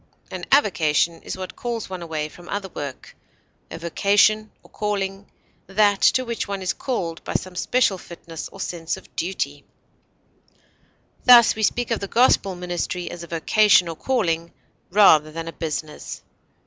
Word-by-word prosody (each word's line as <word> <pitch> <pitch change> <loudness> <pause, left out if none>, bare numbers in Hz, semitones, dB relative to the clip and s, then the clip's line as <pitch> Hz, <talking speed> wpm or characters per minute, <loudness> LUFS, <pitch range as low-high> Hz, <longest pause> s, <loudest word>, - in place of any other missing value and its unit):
An - - -5
avocation 165 - +2
is - - -6
what 185 -1 -7
calls 235 -2 -4
one 185 -2 -6
away 160 -2 -3
from 175 +3 -14
other 200 -1 -3
work; 140 -6 -8 0.5
a - - -7
vocation 205 +5 +2
or - - -20
calling, 200 -1 -3 0.4
that 205 +1 +2
to 255 - +4
which 235 -2 -3
one 200 -1 -4
is 185 - 0
called 175 -11 -4
by - - -5
some 185 -1 -3
special 200 -1 +1
fitness 165 -2 -9
or 195 - -13
sense 170 -3 -3
of - - -17
duty; 145 -5 -3 1.6
thus, 240 -2 +8
we 220 - -6
speak 240 +3 0
of 230 - +1
the 200 - -4
gospel 200 -4 +3
ministry 180 0 -4
as 175 - -8
a 170 - -8
vocation 180 +3 +4
or 165 - -5
calling, 170 -9 -1 0.4
rather 160 -6 +5
than 165 +1 -6
a 165 - -6
business. 155 -2 -5
185 Hz, 160 wpm, -23 LUFS, 165-210 Hz, 1.6 s, thus